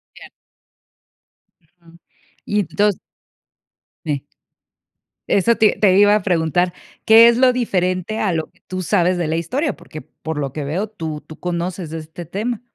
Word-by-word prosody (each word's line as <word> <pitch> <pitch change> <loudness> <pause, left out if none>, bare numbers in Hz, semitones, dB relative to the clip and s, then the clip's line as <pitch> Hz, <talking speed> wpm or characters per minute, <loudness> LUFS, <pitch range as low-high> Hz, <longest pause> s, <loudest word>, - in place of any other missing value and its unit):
Ya. - - -13 1.4
Ujú. 170 +1 -22 0.5
Y 210 - 0
entons 195 +4 0 1.1
Eh 145 -3 -1 1.1
Eso 230 +4 +3
te 215 -1 +3
te 195 -2 +4
iba 205 0 +6
a 210 - 0
preguntar, 175 -1 +1 0.3
¿qué 225 +1 +8
es 235 0 +4
lo 255 -1 +5
diferente 185 -4 -1
a 195 -4 0
lo 160 -1 -2
que - - -33
tú 185 0 -4
sabes 180 0 +2
de 175 -2 -1
la 160 - -1
historia? 260 - -1
Porque, 170 -3 -11
por 160 -1 -7
lo 135 -2 -3
que 150 - -4
veo, 175 +10 -2
tú 160 -8 -6
tú 155 - -12
conoces 175 -1 -4
de 165 - -4
este 160 +2 -9
tema. 215 +7 -3
180 Hz, 160 wpm, -19 LUFS, 160-210 Hz, 1.4 s, qué